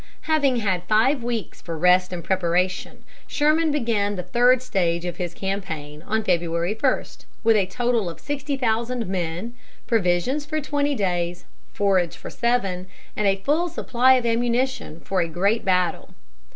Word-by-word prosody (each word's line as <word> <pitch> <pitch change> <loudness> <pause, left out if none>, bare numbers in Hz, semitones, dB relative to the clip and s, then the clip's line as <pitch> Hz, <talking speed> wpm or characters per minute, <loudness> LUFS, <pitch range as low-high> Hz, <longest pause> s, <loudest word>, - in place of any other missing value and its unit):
Having 290 -5 +2
had 195 -6 0
five 240 +6 +3
weeks 235 -3 -4
for 165 -2 -5
rest 180 +2 +4
and 175 -2 -5
preparation, 185 0 -1 0.2
Sherman 310 +2 +2
began 230 -8 0
the 180 - -4
third 250 +3 +3
stage 175 -7 0
of 175 -1 -4
his 175 -1 -4
campaign 160 -7 -4
on 220 +5 -1
February 170 0 0
1, 255 +4 +1 0.4
with 225 0 +5
a 200 -3 +2
total 235 -2 0
of 165 - -9
sixty 290 -1 -3
thousand 235 0 0
men, 180 +4 -3 0.3
provisions 225 +6 +1
for 310 +1 -2
twenty 290 -1 0
days, 175 -4 -1 0.3
forage 190 -4 +1
for - - -9
seven, 195 -7 0 0.3
and 210 - +1
a 195 0 +1
full 325 - +1
supply 260 -3 +3
of 250 -2 0
ammunition 240 - 0
for 190 -2 0
a 170 - 0
great 195 +7 0
battle. 180 -2 0
205 Hz, 155 wpm, -23 LUFS, 180-250 Hz, 0.4 s, with